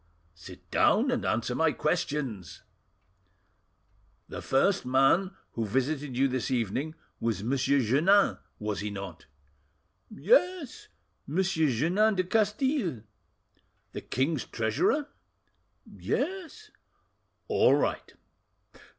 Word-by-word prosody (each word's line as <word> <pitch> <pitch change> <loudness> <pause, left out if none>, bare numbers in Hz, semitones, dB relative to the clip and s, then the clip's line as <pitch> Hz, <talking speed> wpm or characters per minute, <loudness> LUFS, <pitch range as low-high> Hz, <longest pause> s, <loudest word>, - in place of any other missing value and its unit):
"Sit 85 -1 -14
down, - - +3
and - - -1
answer 120 +3 -1
my 160 +3 +2
questions." 145 - -3 1.7
"The - - -6
first 185 +8 +2
man 135 +9 +2 0.2
who 115 - -3
visited 135 +4 -2
you 135 +1 +3
this 130 -1 -2
evening 130 +5 -2 0.2
was 115 -4 -1
M. 120 +6 -1
Jeannin, 140 - +3 0.2
was 105 -1 -3
he 105 - -3
not?" 100 -5 -8 0.8
"Yes, 355 - +1 0.4
M. 160 +6 -1
Jeannin 175 - +2
de 185 - +1
Castille." 210 - 0 0.9
"The - - -6
king's 135 +2 -1
treasurer?" 115 - 0 0.8
"Yes." 385 +4 -4 0.8
"All - - +4
right. - - -1
145 Hz, 100 wpm, -28 LUFS, 120-195 Hz, 1.7 s, All